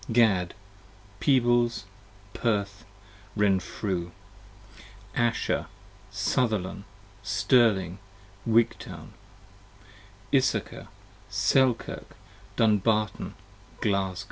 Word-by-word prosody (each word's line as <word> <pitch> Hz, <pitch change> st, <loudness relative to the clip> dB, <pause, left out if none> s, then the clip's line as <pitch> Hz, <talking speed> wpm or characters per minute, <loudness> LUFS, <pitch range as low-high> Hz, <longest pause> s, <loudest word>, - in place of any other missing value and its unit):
Gad, 105 Hz, -7 st, +3 dB, 0.6 s
Peebles, 120 Hz, -5 st, +2 dB, 0.5 s
Perth, 100 Hz, -2 st, -1 dB, 0.5 s
Renfru. 95 Hz, -2 st, 0 dB, 1.1 s
Asher, 120 Hz, -1 st, 0 dB, 0.4 s
Sutherlan, 100 Hz, -2 st, -1 dB, 0.4 s
Stirling, 100 Hz, -8 st, +2 dB, 0.5 s
Wigtoun. 115 Hz, 0 st, 0 dB, 1.2 s
Issachar, 135 Hz, -2 st, +1 dB, 0.4 s
Selkirk, 120 Hz, +6 st, +1 dB, 0.4 s
Dumbartn, 110 Hz, -1 st, +1 dB, 0.4 s
Glasgo. 95 Hz, -3 st, 0 dB
105 Hz, 50 wpm, -27 LUFS, 95-120 Hz, 1.2 s, Gad